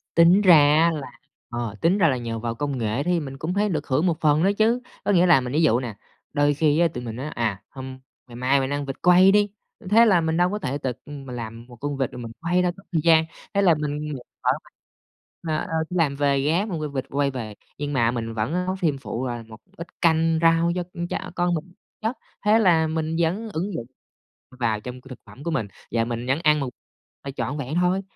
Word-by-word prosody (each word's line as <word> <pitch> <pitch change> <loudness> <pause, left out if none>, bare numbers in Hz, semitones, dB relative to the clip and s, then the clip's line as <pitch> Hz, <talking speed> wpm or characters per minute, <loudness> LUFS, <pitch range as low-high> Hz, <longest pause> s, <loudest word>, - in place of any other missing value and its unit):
Tính 170 +4 +6
ra 185 -5 +8
á, 150 +3 +5
là 145 -6 -5 0.4
ờ, 120 -3 -4
tính 175 +5 +3
ra 170 - +4
là 130 - +1
nhờ 115 -2 -4
vào 115 0 -3
công 140 +1 -2
nghệ 115 +3 -1
thì 175 0 +1
mình 135 -2 -7
cũng 160 +5 -3
thấy 205 +1 +1
được 155 -4 -2
hưởng 145 +7 +1
một 170 -3 +1
phần 155 +1 +3
nữa 195 - +4
chứ. 230 +3 +3 0.2
Có - - +1
nghĩa 180 -2 +5
là 170 -7 +6
mình 125 +1 -5
ví 155 - +2
dụ 120 -7 +4
nè, 120 -5 -5 0.4
đôi 145 0 +3
khi 150 +1 +2
á, 170 - +5
tụi 125 - -5
mình 115 -2 -5
nói: 130 +4 -5
"À, 110 -8 -2
hôm 130 -1 -8 0.3
ngày 120 - -12
mai 130 +3 +2
mình 135 0 -1
ăn 145 0 -2
vịt 135 - -5
quay 180 +2 +6
đi!" 205 0 +3 0.4
thế 230 +3 +6
là 185 -6 +4
mình 160 +1 0
đâu 180 +1 +3
có 210 - -2
thể 140 -6 -2
tự, 135 -3 -2
ưm, 145 -2 -9
mà 125 - -7
làm 115 -1 -7
một 125 - -13
con 145 +3 -4
vịt 135 -3 -1
rồi 125 - -8
mình 115 -1 -7
quay 175 +2 +2
đâu, 180 -1 +1
tốn 195 - -16
thời 165 -3 +1
gian, 160 -1 +5 0.3
thế 200 - +2
là 175 -4 +5
mình 150 0 -3 0.3
ờ, - - +3 1.0
ờ, - - -3 0.2
đi 180 - -3
làm 145 -4 +2
về 140 -1 +2
ghé 165 +8 +1
mua 165 -8 -3
v 140 - -13
vịt 130 - -2
quay 140 0 0
về, 110 -5 -6 0.2
nhưng 145 0 -3
mà 120 -2 +2
mình 115 -2 -4
vẫn 110 +6 -2
nấu 185 +1 -1
thêm 160 -7 0
phụ 130 -1 -4
là 120 -2 -4
một 110 0 -12 0.2
ít 170 +1 -7
canh 165 -1 +3
rau 165 +1 +4
cho 180 - -1
con 175 0 -4
tr - - -4 0.2
con 175 0 +1
mình 170 +3 -6 0.3
chất, 225 +4 -2 0.3
thế 215 +2 +5
là 165 -6 +4
mình 160 0 -2
vẫn 195 +7 0
ứng 185 +5 -2
dụng 115 - -4 0.7
vào 110 -3 0
trong 125 +2 -8
cái 130 - -16
thực 130 - -9
phẩm 140 - -13
của 170 - -1
mình 135 -10 -1 0.3
và 115 0 +2
mình 120 +1 -4
vẫn 135 +3 +1
ăn 150 -2 +3
một 135 - -2 0.6
là 140 - -4
trọn 145 +3 -2
vẹn 140 +2 -4
thôi. 180 +2 +2
150 Hz, 250 wpm, -24 LUFS, 130-175 Hz, 1.0 s, ra